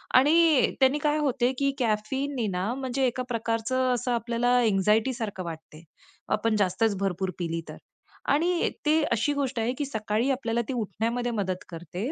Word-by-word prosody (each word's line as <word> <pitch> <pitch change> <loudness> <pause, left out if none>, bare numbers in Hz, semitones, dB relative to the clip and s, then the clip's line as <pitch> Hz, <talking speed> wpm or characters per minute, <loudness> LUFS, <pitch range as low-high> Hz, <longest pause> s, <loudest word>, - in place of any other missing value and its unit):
आणि 305 +1 +5
त्यांनी 265 +1 +4
काय 300 0 +2
होते 255 -4 +1
की 275 0 +2
कॅफीनने 240 +3 -1
ना, 190 +4 -1
म्हणजे 265 0 -1
एका 250 +1 -2
प्रकारचं 235 +2 0
असं 245 +1 -2
आपल्याला 235 +1 +1
अँजायटी, 215 +2 +2
सारखं 215 -6 -4
वाटते, 160 -1 -9 0.5
आपण 215 +1 +1
जास्तच 200 +2 +1
भरपूर 190 -1 -1
पिली 165 -1 -2
तर. - - -8 0.5
आणि 340 +4 +2 0.2
ती 310 +2 +4
अशी 235 +6 +1
गोष्ट 275 -4 -2
आहे 230 +2 0
की 290 - -1
सकाळी 220 -1 -1
आपल्याला 235 -3 -1
ती - - -2
उठण्यामध्ये 235 +2 -2
मदत 190 -4 -2
करते, 175 - -5
235 Hz, 160 wpm, -27 LUFS, 210-265 Hz, 0.5 s, आणि